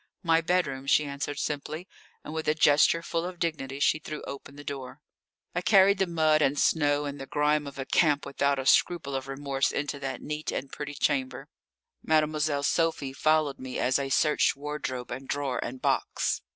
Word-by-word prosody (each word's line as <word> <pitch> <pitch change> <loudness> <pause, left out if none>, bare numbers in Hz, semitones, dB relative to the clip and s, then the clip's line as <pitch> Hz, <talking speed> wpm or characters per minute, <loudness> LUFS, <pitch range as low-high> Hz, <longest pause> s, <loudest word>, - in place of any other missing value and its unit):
"My 165 -1 +3
bedroom," 160 -6 -1
she 150 +2 +4
answered 140 0 -4
simply, 155 +5 -4 0.4
and 150 - -7
with 160 0 -4
a 150 - +3
gesture 155 +2 +4
full 165 0 -2
of 180 0 -5
dignity 140 -5 -3
she 155 - +3
threw 155 -1 -7
open 140 0 -8
the 145 - -10
door. 135 -1 -7 0.5
I 180 - -1
carried 195 +1 +5
the 190 - +2
mud 155 -2 +3
and 145 0 +2
snow 145 -2 +2
and 140 -1 -5
the 135 - -7
grime 150 +1 +1
of 140 - -9
a 135 - -4
camp 150 -2 +2
without 140 0 0
a 135 - -3
scruple 140 0 +3
of 135 0 -3
remorse 135 0 -1
into 145 0 -3
that 135 -1 -5
neat 150 +1 -4
and 135 - -4
pretty 145 -1 -6
chamber. 135 -2 -1 0.5
Mademoiselle 155 -2 +1
Sophie 155 -3 0
followed 155 -1 +1
me 130 -1 -6
as 130 +3 +2
I 135 -1 -2
searched 150 +3 +3
wardrobe 140 -3 -5
and 130 +2 -6
drawer 140 -3 -2
and 125 +2 -6
box. - - 0
145 Hz, 190 wpm, -28 LUFS, 135-155 Hz, 0.5 s, carried